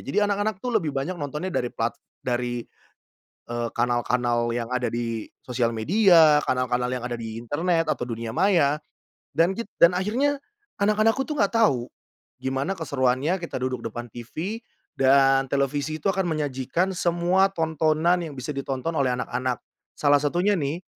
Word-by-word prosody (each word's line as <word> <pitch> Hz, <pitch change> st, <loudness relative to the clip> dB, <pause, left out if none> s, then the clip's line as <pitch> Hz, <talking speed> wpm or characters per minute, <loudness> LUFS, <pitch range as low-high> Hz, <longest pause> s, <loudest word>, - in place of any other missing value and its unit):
Jadi 135 Hz, -, -2 dB
anak-anak 205 Hz, -1 st, -1 dB
tuh 250 Hz, -, -1 dB
lebih 155 Hz, -5 st, -3 dB
banyak 170 Hz, +7 st, -2 dB
nontonnya 150 Hz, +4 st, -4 dB
dari 125 Hz, -, 0 dB
plat 115 Hz, +1 st, -1 dB, 0.3 s
dari, 120 Hz, -1 st, -1 dB, 0.8 s
eee, 120 Hz, 0 st, -2 dB
kanal-kanal 120 Hz, 0 st, +1 dB
yang 115 Hz, -1 st, -3 dB
ada 125 Hz, -1 st, 0 dB
di 115 Hz, -2 st, -3 dB, 0.2 s
sosial 120 Hz, -2 st, 0 dB
media, 165 Hz, -, +5 dB
kanal-kanal 125 Hz, -1 st, +1 dB
yang 125 Hz, -1 st, -3 dB
ada 120 Hz, -1 st, -3 dB
di 115 Hz, -1 st, -6 dB
internet 165 Hz, +7 st, 0 dB
atau -, -, -1 dB
dunia 115 Hz, -1 st, -4 dB
maya 155 Hz, -, +3 dB, 0.6 s
dan 170 Hz, +4 st, +4 dB
git 230 Hz, -2 st, -5 dB
dan 170 Hz, +1 st, +8 dB
akhirnya 260 Hz, +10 st, 0 dB, 0.4 s
anak-anakku 215 Hz, +5 st, +3 dB
tuh 300 Hz, -, -3 dB
enggak 200 Hz, +3 st, +2 dB
tahu 125 Hz, -, +2 dB, 0.5 s
gimana 135 Hz, +7 st, -1 dB
keseruannya 140 Hz, +2 st, 0 dB
kita 170 Hz, -, -8 dB
duduk 130 Hz, -1 st, -2 dB
depan 120 Hz, +2 st, -6 dB
TV 155 Hz, -, -5 dB, 0.4 s
dan 135 Hz, 0 st, +5 dB
televisi 140 Hz, +3 st, -1 dB
itu -, -, +2 dB
akan 190 Hz, -1 st, 0 dB
menyajikan 150 Hz, +3 st, -1 dB
semua 175 Hz, +1 st, +2 dB
tontonan 160 Hz, +1 st, +2 dB
yang 155 Hz, -3 st, -7 dB
bisa 130 Hz, +3 st, -5 dB
ditonton 135 Hz, +2 st, -3 dB
oleh 130 Hz, -3 st, +2 dB
anak-anak. 125 Hz, 0 st, -2 dB, 0.3 s
Salah 145 Hz, -1 st, +4 dB
satunya 175 Hz, +8 st, +1 dB
nih, 150 Hz, +5 st, -2 dB
140 Hz, 150 wpm, -25 LUFS, 125-175 Hz, 0.8 s, dan